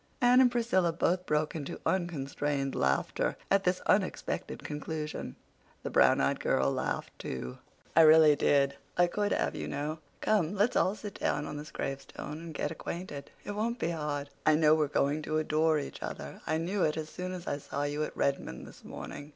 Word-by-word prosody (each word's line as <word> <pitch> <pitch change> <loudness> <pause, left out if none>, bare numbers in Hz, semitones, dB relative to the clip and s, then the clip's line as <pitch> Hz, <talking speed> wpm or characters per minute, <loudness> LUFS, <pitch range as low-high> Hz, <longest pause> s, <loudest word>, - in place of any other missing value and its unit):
Anne 250 0 +6
and 250 -2 +5
Priscilla 225 -8 +2
both 180 +2 0
broke 150 0 +1
into 145 -3 -5
unconstrained 145 -5 -1
laughter 65 0 0
at 195 0 +3
this 180 0 +1
unexpected 195 -2 0
conclusion. 150 +1 -5 0.5
The - - -4
brown - - +5
eyed - - +1
girl 65 +1 +2
laughed, - - -2
too. 65 -1 -5 0.4
"I 165 - +8
really 155 -1 +8
did. 140 -1 +3 0.2
I 175 - +6
could 205 +4 -1
have, - - 0
you - - -4
know. 150 +3 -3 0.2
Come, 200 -4 +1
let's 210 +5 +2
all 190 - +3
sit 205 -1 -8
down 150 - 0
on 150 - -5
this 150 +1 -7
gravestone 135 +2 -5
and 165 0 -8
get 150 - -1
acquainted. 165 -3 -6
It - - -5
won't 225 +3 -1
be 170 - -1
hard. 145 -3 -3
I 155 - +5
know 155 0 +5
we're 155 -1 +3
going 145 +1 +1
to 155 0 -1
adore 155 0 +2
each 145 - -5
other—I 115 - -4
knew 180 +5 -1
it 155 -2 +2
as 155 -1 -4
soon 180 0 -5
as 180 -2 -6
I 145 - -2
saw 140 0 -4
you 145 +1 -1
at - - -6
Redmond 135 - -1
this - - -14
morning. 145 - -8
155 Hz, 190 wpm, -30 LUFS, 145-180 Hz, 0.5 s, I